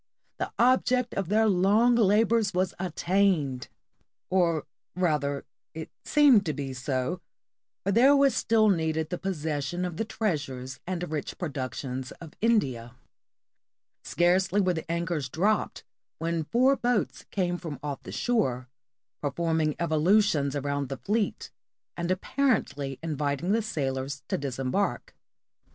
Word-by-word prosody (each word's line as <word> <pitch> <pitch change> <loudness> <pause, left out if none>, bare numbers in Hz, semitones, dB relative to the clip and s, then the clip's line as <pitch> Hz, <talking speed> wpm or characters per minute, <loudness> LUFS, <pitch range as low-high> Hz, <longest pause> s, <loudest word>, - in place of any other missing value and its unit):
The - - -2
object 250 0 +3
of 195 -3 -2
their 220 +2 +3
long 205 +5 +4
labors 220 -1 +3
was 185 0 +1
attained! 175 - 0 0.6
Or 170 -4 +2 0.3
rather, 150 -6 0 0.3
it 160 -1 -7
seemed 280 -8 +5
to 155 - 0
be 135 -2 -5
so, 130 +6 -2 0.6
for 200 - 0
there 255 +7 +6
was 275 -3 +4
still 220 -1 +3
needed 160 -3 0
the 180 - -3
possession 160 -2 -2
of 175 -3 -5
the - - 0
treasures 145 - -3
and 180 -1 -3
rich 150 -2 -4
productions 130 -4 -4
of 165 -2 -12
India. 130 - +1 1.1
Scarcely 185 +3 +2
were 185 -2 +2
the 165 0 -5
anchors 170 -5 -2
dropped 205 - 0 0.3
when 165 -1 -2
four 255 - +3
boats 245 -5 -1
came 180 -3 -1
off 175 - -5
from 155 -6 -6 0.2
the - - -9
shore, 130 - 0 0.5
performing 160 +1 0
evolutions 160 -2 +2
around 140 -1 -2
the 135 - -4
fleet, 205 - -2 0.4
and 170 0 -3
apparently 185 - 0
inviting 150 +2 -1
the 225 +2 +2
sailors 140 - -3
to - - 0
disem 135 -2 -3
bark. 200 - -1
170 Hz, 130 wpm, -27 LUFS, 145-205 Hz, 1.1 s, there